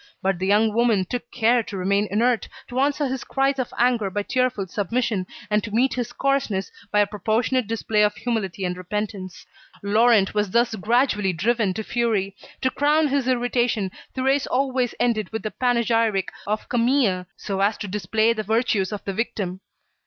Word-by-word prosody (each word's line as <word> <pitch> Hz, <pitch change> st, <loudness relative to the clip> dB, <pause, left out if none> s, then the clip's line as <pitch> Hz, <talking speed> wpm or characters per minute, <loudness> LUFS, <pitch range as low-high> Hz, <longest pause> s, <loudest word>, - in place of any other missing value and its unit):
But 190 Hz, -2 st, +1 dB
the 190 Hz, -, -1 dB
young 210 Hz, +2 st, +3 dB
woman 225 Hz, -4 st, +2 dB
took 240 Hz, +4 st, -5 dB
care 240 Hz, 0 st, +3 dB
to 205 Hz, -3 st, -7 dB
remain 200 Hz, +3 st, +1 dB
inert, 230 Hz, +4 st, +1 dB, 0.2 s
to 250 Hz, -, -2 dB
answer 285 Hz, +2 st, +1 dB
his 265 Hz, 0 st, -3 dB
cries 270 Hz, 0 st, 0 dB
of 255 Hz, -, -2 dB
anger 235 Hz, -4 st, +2 dB
by 205 Hz, +2 st, -2 dB
tearful 255 Hz, -4 st, 0 dB
submission, 205 Hz, +1 st, -1 dB, 0.2 s
and 210 Hz, 0 st, +1 dB
to -, -, -5 dB
meet 240 Hz, +5 st, +2 dB
his 245 Hz, -2 st, -3 dB
coarseness 270 Hz, -8 st, -1 dB, 0.2 s
by 210 Hz, -, +4 dB
a -, -, +4 dB
proportionate 220 Hz, +4 st, 0 dB
display 220 Hz, -1 st, 0 dB
of 210 Hz, 0 st, +3 dB
humility 200 Hz, -6 st, -2 dB
and 180 Hz, 0 st, -2 dB
repentance. 185 Hz, 0 st, -5 dB, 0.4 s
Laurent 215 Hz, 0 st, +4 dB
was 210 Hz, -1 st, 0 dB
thus 235 Hz, +3 st, +2 dB
gradually 215 Hz, -2 st, +1 dB
driven 215 Hz, +4 st, +1 dB
to 220 Hz, -, -3 dB
fury. 215 Hz, -5 st, -1 dB, 0.3 s
To 260 Hz, -, +1 dB
crown 295 Hz, +2 st, +2 dB
his 275 Hz, -2 st, 0 dB
irritation, 240 Hz, -5 st, +1 dB, 0.3 s
Thérèse 270 Hz, +2 st, +1 dB
always 255 Hz, -2 st, 0 dB
ended 215 Hz, -5 st, 0 dB
with 220 Hz, -, -4 dB
the 215 Hz, -, -3 dB
panegyric 230 Hz, -5 st, +1 dB, 0.2 s
of 215 Hz, +1 st, -2 dB
Camille 235 Hz, -7 st, +1 dB
so 195 Hz, -2 st, -4 dB
as 205 Hz, +2 st, +2 dB
to 205 Hz, -, -5 dB
display 215 Hz, +3 st, +1 dB
the 220 Hz, -, -3 dB
virtues 220 Hz, -2 st, 0 dB
of 210 Hz, -, -6 dB
the 195 Hz, -, -2 dB
victim. 200 Hz, -4 st, -3 dB
220 Hz, 175 wpm, -23 LUFS, 200-245 Hz, 0.4 s, by